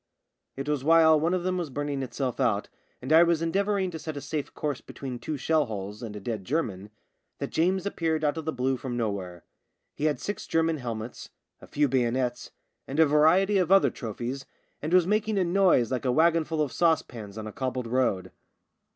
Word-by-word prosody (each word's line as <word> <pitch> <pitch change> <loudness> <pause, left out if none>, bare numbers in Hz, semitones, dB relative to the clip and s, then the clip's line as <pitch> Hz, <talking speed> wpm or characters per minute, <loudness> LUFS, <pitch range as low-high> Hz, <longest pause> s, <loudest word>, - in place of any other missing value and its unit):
It 135 +1 -5
was 150 -3 -1
while 160 0 +6
one 165 +4 +1
of 180 - -2
them 185 0 0
was 170 -4 -3
burning 145 0 -3
itself 130 -1 -3
out, 105 -2 +1 0.3
and 135 +5 0
I 160 - +8
was 170 -1 +3
endeavouring 195 +2 0
to 160 - -6
set 155 -1 -6
a - - -2
safe 150 -1 -4
course 145 -4 -3
between 130 -3 -7
two 155 +3 -4
shell 155 +2 +2
holes 105 -1 -6
and 110 -3 -6
a - - -5
dead 105 -1 -4
German, 105 - -2 0.5
that - - -5
James 185 +4 +1
appeared 160 -5 -1
out 150 0 +1
of 160 -2 -5
the 160 - 0
blue 130 -1 0
from 125 -1 -5
nowhere. 95 -6 -3 0.5
He 150 - -3
had 150 -5 +1
six 205 -1 -5
German 165 0 +1
helmets, 115 -2 -6 0.3
a - - -12
few 145 0 +1
bayonets, 125 -1 0 0.4
and 140 +3 -3
a 160 - +8
variety 165 +7 +4
of 180 -1 0
other 195 0 +6
trophies, 125 +3 -5 0.3
and 155 - -3
was 180 -1 +5
making 210 +2 +1
a 190 - +3
noise 175 - +3
like 130 0 -2
a 125 - +2
wagonful 160 +1 +2
of 140 - -4
saucepans 120 - 0
on 110 - -5
a 110 - -6
cobbled 130 -1 -3
road. 115 -6 0
145 Hz, 205 wpm, -27 LUFS, 125-165 Hz, 0.5 s, I